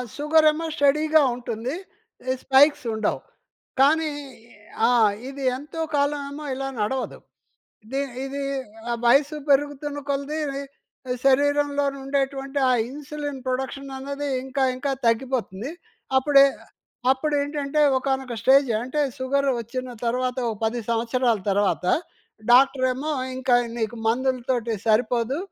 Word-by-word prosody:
Sugar 310 +2 +3
ఏమో 320 +2 -4
స్టెడీగా 305 +2 +4
ఉంటుంది. 240 +2 -4 0.6
ఈ - - +2
స్పైక్స్ 275 0 +5
ఉండవు. 215 -1 -1 0.6
కానీ 310 +2 +4 0.8
ఆ! - - +3 0.4
ఇది 275 0 -7
ఎంతో 300 +4 -7
కాలం 285 0 +1
ఏమో 295 +1 -7
ఇలా 270 +1 -3
నడవదు. 250 +5 -2 0.7
ది 270 +1 0 0.2
ఇది 275 +1 -4 0.6
వయసు 280 +5 +4
పెరుగుతున్న 290 +1 +1
కొలది 280 +3 -2 0.9
శరీరంలోని 285 0 +2
ఉండేటువంటి 275 0 -1
ఆ - - +4 0.2
ఇన్సులిన్ 290 0 -6
ప్రొడక్షన్ 265 +2 -3
అన్నది 280 +2 -4 0.2
ఇంకా 265 +1 -1
ఇంకా 275 +2 -2 0.2
తగ్గిపోతుంది. 240 0 -1 0.5
అప్పుడే 275 +1 +6 0.7
అప్పుడేంటంటే 290 +1 0 0.2
ఒకానొక 265 -2 -2
స్టేజ్, 270 +2 +5
అంటే 280 +4 -1 0.2
సుగరు 275 +1 +1
వచ్చిన 250 +2 -5
తర్వాత 250 +2 -1
ఒక 220 - -3
10 230 +2 -1
సంవత్సరాల 235 0 +1
తర్వాత 195 -2 +1 0.7
డాక్టరేమో 260 +3 +3 0.2
ఇంకా 255 -1 +2 0.2
నీకు 225 0 -2
మందులతోటి 245 -1 0
సరిపోదు. 235 +4 +2
270 Hz, 110 wpm, -24 LUFS, 250-285 Hz, 0.9 s, అప్పుడే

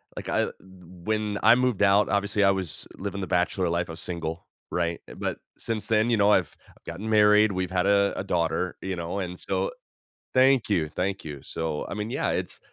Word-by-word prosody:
like, - - -6
I - - +2
l - - -3
when 95 +3 -4
I 115 +2 +8
moved 125 -5 +1
out, 100 0 +5
obviously 100 +1 +1
I 100 - +6
was 95 -5 -3
living 100 0 -4
the 95 - -4
bachelor 90 +1 +1
life, 85 0 -1
I 80 - -5
was 80 - -5
single, 85 -1 -4 0.2
right, 85 -1 -1
uh, - - -10
but - - -3 0.2
since 110 -2 -2
then, 110 +1 +2
you 120 - +3
know, 105 +1 +4
I've 90 -6 +2
I've - - -24
gotten 110 +3 -6
married, 105 0 +5
we've 95 -1 -2
had 90 0 +1
a 100 0 +3
a - - -2
daughter, 90 0 -1
you 95 0 -3
know, 85 +3 -4
and 90 -1 -4
so - - 0 0.6
Thank 130 -2 +4
you, 85 -7 +1
thank 95 +4 -3
you, 75 -3 -7
so, 80 -1 -4
I - - -4
mean, 105 +2 -4
yeah, - - -1
it's - - -2
95 Hz, 215 wpm, -26 LUFS, 85-105 Hz, 0.6 s, I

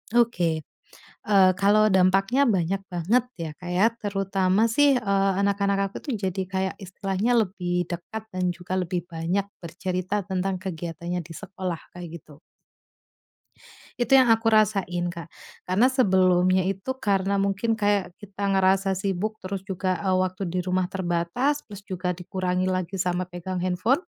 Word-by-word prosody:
Oke, 175 -10 +2 0.6
eee, 195 -3 +5
kalau 205 +2 +4
dampaknya 195 +7 +3
banyak 195 -4 0
banget 195 +9 +2 0.2
ya, 165 -2 -3
Kak, 180 +2 -8
ya. 190 +5 +4
Terutama 195 0 +1
sih, 285 +5 +4
eee, 200 -5 +2
anak-anak 200 0 +1
aku 195 - -12
tuh 285 - -3
jadi 190 -1 -1
kayak 190 0 -2
istilahnya 195 +3 -2 0.2
lebih 175 -2 -2
dekat, 210 +6 -6
dan 185 -2 -1
juga 180 +1 -5
lebih 180 -1 -2
banyak 175 +4 -2
bercerita 185 +3 -3
tentang 190 0 -1
kegiatannya 175 -1 -4
di 165 - -10
sekolah, 185 -2 -5 0.2
kayak 170 -2 -8
gitu. 150 0 -18 1.6
Itu 240 +2 +1
yang 260 -2 +7
aku 225 0 +3
rasain, 195 -5 +2
Kak. 170 -1 -7 0.4
Karena 205 +8 +3
sebelumnya 185 -6 +3
itu, 195 +7 -3
karena 195 -1 +1
mungkin 200 +3 0
kayak 205 -4 0
kita 200 0 -5
ngerasa 190 0 +3
sibuk, 195 +3 -2
terus 190 0 -5
juga, 185 -1 -1
eee, 190 - +2
waktu 185 +1 0
di 180 +1 -1
rumah 185 0 0
terbatas, 185 +11 -1
plus 205 -2 -10
juga 185 -2 -3
dikurangi 185 +1 -2
lagi 185 0 -2
sama 180 0 -1
pegang 180 +1 -6
handphone 185 - +1
190 Hz, 145 wpm, -25 LUFS, 180-200 Hz, 1.6 s, yang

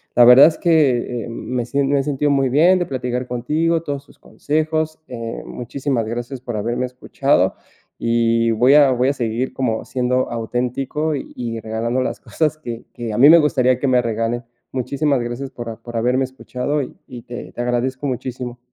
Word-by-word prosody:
la 120 - +7
verdad 125 +5 +9
es 160 - -1
que, 130 - +2
eh, - - -8
me 120 +1 -3
sien 140 +2 0
me 140 0 +3
he - - 0
sentido 145 +1 0
muy 135 -2 +2
bien 170 +8 +4
de 175 - 0
platicar 125 -1 -3
contigo, 155 +7 0
todos 140 -2 -4
tus - - -20
consejos, 155 +1 -2
eh, 115 -2 -6
muchísimas 125 -1 -3
gracias 120 +3 -5
por 120 -3 -5
haberme 120 +4 -1
escuchado 125 -5 +1 0.5
y 115 0 +2
voy 125 +5 +4
a 145 -2 +7
voy 125 +1 +2
a - - +1
seguir 120 -1 -2
como 115 -4 -2
siendo 125 0 0
auténtico 125 +6 -2
y 120 -4 -5
regalando 115 +3 -2
las - - -3
cosas 155 -1 -1
que 120 -5 -7
que 115 -2 -5
a - - -2
mí 140 - +8
me 170 - +9
gustaría 130 -5 +2
que 140 - 0
me 125 -1 +4
regalen. 115 +1 -2 0.3
Muchísimas 135 +2 0
gracias 120 +3 -5
por 115 -3 -7
por 120 -1 -9
haberme 125 +3 +1
escuchado 130 +2 -3
y - - -9
y 120 -2 -9
te 120 - -8
te 120 - -4
agradezco 130 +3 -1
muchísimo. 125 -1 -5
125 Hz, 185 wpm, -20 LUFS, 120-140 Hz, 0.5 s, verdad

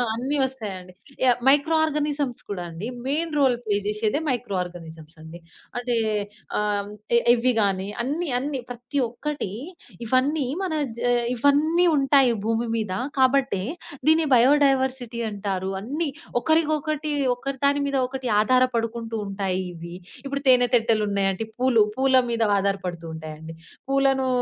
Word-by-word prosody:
అన్ని 265 +5 -2
వస్తాయండి. 205 -9 -4 0.3
య 260 - +5 0.2
మైక్రో 290 +4 +4
ఆర్గానిజమ్స్ 290 -4 -2
కూడా 180 -3 -3
అండి. 165 +6 -6 0.2
Main 315 +4 -1
role 260 -3 +4
play 205 -2 +1
జేశెదే 210 +4 0
micro 245 -5 -2
organisms 165 -2 -10
అండి. 160 +2 -10 0.4
అంటే 245 -1 -1 0.6
ఆహ్, 210 0 +1
హ్మ్. 200 - -10 0.3
ఎ - - +7
ఎవ్వి 245 +1 +2
గాని, 195 -2 0 0.2
అన్నీ, 305 +6 -2
అన్ని 280 +1 -3
ప్రతి 245 +4 -5
ఒక్కటి 295 0 -4 0.6
ఇవన్నీ 270 +5 +2 0.2
మన 360 -5 -2 0.2
జ - - -5
ఆహ్, 240 -1 +1
ఇవన్నీ 300 +7 +3
ఉంటాయి 270 -3 +4
భూమి 230 +1 0
మీద. 215 -4 -2 0.3
కాబట్టే 260 -6 +2 0.5
దీన్ని 315 0 +4
బయోడైవర్సిటీ 260 -2 +3
అంటారు. 195 -2 -3
అన్ని 290 +10 -2 0.3
ఒకరికి 315 +2 +2
ఒకటి 305 0 -3 0.2
ఒకదాని 275 +2 0
మీద 275 - -1
ఒకటి 260 -1 -5
ఆధారపడుకుంటూ 230 -2 0
ఉంటాయి 195 -2 -2
ఇవి. 170 +1 -9 0.3
ఇప్పుడు 280 0 -3
తేనె 245 -1 +5
తెట్టెలున్నాయంటే, 210 -3 +1
పూలు 245 -4 +4
పూల 265 0 +2 0.2
మీద 230 -1 0 0.2
ఆధారపడుతూ 185 -4 -2
ఉంటాయండి. 160 +1 -8 0.4
పూలను 270 -1 +2
245 Hz, 135 wpm, -24 LUFS, 205-275 Hz, 0.6 s, ఎ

